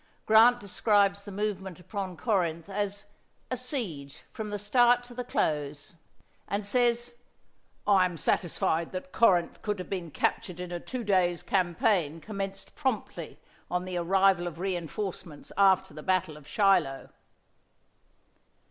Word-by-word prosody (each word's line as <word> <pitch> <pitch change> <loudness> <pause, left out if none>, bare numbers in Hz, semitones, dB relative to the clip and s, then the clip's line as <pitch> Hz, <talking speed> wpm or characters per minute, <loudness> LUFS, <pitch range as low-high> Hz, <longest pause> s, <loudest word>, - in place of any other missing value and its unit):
Grant 230 +3 +6
describes 200 -1 +2
the 205 - -7
movement 195 -3 -3
upon 185 0 -5
Corinth 170 -5 0
as 200 0 -3 0.5
"a - - +1
siege 205 - -5
from 215 -1 -5
the 205 - -3
start 240 +4 +4
to 245 0 -11
the 250 +1 -4
close" 150 - -2 0.5
and 200 +1 -2
says, 240 +2 +1 0.7
"I 195 -3 +5
am 175 -2 -3
satisfied 165 +1 0
that 185 0 -6
Corinth 180 -7 +3
could 210 -1 -2
have 185 - -8
been 180 -4 -3
captured 180 +3 -1
in 180 -1 -6
a 175 - -3
two 250 +6 -5
days' 180 -4 +2
campaign 175 -3 +1
commenced 195 0 -6
promptly 225 - -3 0.3
on 180 +2 -1
the 185 -1 -3
arrival 190 0 +3
of 170 -2 -6
reinforcements 180 -2 -4
after 190 -1 +4
the 155 - -8
battle 185 -2 0
of 150 -2 -14
Shiloh." 170 -5 +2
190 Hz, 140 wpm, -29 LUFS, 175-210 Hz, 0.7 s, Grant